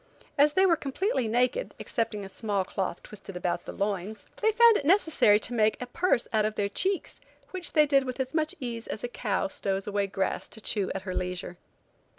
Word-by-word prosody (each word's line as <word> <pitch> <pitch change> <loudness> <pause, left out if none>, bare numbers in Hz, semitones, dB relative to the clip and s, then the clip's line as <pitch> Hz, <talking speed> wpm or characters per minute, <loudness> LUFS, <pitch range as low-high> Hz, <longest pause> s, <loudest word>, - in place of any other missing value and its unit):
As 290 +1 +4
they 380 +4 +4
were 345 -3 +5
completely 295 - -1
naked, 250 - 0
excepting 225 -4 -2
a - - -7
small 200 -1 -1
cloth 185 -2 -3
twisted 195 -3 -9
about 175 -1 -2
the - - -6
loins, 200 +1 -3
they 440 0 +4
found 465 +1 +6
it 290 - 0
necessary 320 - +4
to 245 - -4
make 220 -2 +2
a 250 - -4
purse 250 0 +1
out 215 -1 +3
of 215 0 -1
their 200 -1 0
cheeks, 375 - -1 0.3
which 370 -2 -4
they 305 -2 +6
did 275 -2 +3
with 255 +1 -5
as 260 +2 -2
much 310 -1 0
ease 235 -3 -5
as 215 - -5
a - - -1
cow 210 -5 -1
stows 195 0 -2
away 200 -1 -1
grass 195 0 -2
to - - -8
chew 205 -2 0
at 195 - -4
her 185 -1 -4
leisure. 180 -1 -4
225 Hz, 210 wpm, -28 LUFS, 200-300 Hz, 0.3 s, found